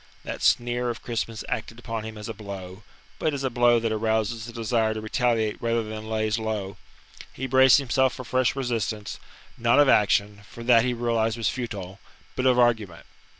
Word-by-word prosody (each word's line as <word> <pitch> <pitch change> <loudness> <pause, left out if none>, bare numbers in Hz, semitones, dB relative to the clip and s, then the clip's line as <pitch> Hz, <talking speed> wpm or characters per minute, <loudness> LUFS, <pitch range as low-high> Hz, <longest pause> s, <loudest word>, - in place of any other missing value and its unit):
That - - -6
sneer 120 0 +2
of 120 - -5
Crispin's 115 -1 -3
acted 115 -3 -4
upon 115 -2 -5
him 110 -1 -7
as 105 - -7
a 115 - -4
blow 100 -2 -8 0.4
but 155 -2 0
as 135 - -4
a 130 - -1
blow 120 0 +4
that 115 -1 -1
arouses 110 +1 -1
the - - -7
desire 115 -1 0
to 110 - -4
retaliate 110 -1 0
rather 115 0 0
than 110 0 -7
lays 110 0 0
low. 105 -3 -4 0.5
He 130 - -5
braced 130 0 +6
himself 130 -1 +1
for 130 - -8
fresh 130 +1 +1
resistance; 115 -5 -3 0.4
not 120 +2 +3
of 145 - +6
action, 105 -3 +3
for 115 - -10
that 115 -2 +5
he 125 -1 0
realized 115 -1 0
was 115 -1 0
futile, 100 -6 -6 0.4
but 130 - +1
of 125 -1 +4
argument. 110 -8 +1
115 Hz, 190 wpm, -25 LUFS, 110-120 Hz, 0.5 s, braced